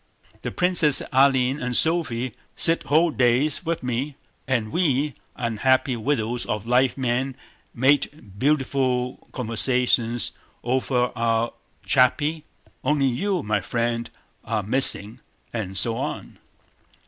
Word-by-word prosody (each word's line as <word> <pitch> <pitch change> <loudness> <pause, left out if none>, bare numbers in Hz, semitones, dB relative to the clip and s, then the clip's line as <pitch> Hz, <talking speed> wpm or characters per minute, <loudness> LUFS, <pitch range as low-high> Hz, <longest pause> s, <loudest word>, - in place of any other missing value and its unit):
The - - -4
princesses 175 -5 +4
Aline 135 0 +3
and 125 -1 -1
Sophie 130 -8 +1 0.2
sit 165 0 +3
whole 160 +3 +3
days 125 +5 +1
with 165 -3 -3
me, 125 +4 -3 0.3
and 115 -5 -1
we, 150 -4 0 0.2
unhappy 125 +3 +1
widows 120 0 -1
of 105 0 -3
live 125 +2 +2
men, 130 +1 -1 0.4
make 135 +4 +2 0.3
beautiful 130 -3 0
conversations 120 0 +2 0.3
over 125 0 0
our 115 0 0 0.3
charpie, 150 +5 +2 0.4
only 145 0 +1
you, 170 +8 -1
my 105 -1 0
friend, 115 +3 -2 0.3
are 110 -2 -2
missing..." 110 -1 +2 0.3
and 100 -5 -4
so 115 +4 +1
on. - - -6
125 Hz, 110 wpm, -23 LUFS, 115-140 Hz, 0.4 s, princesses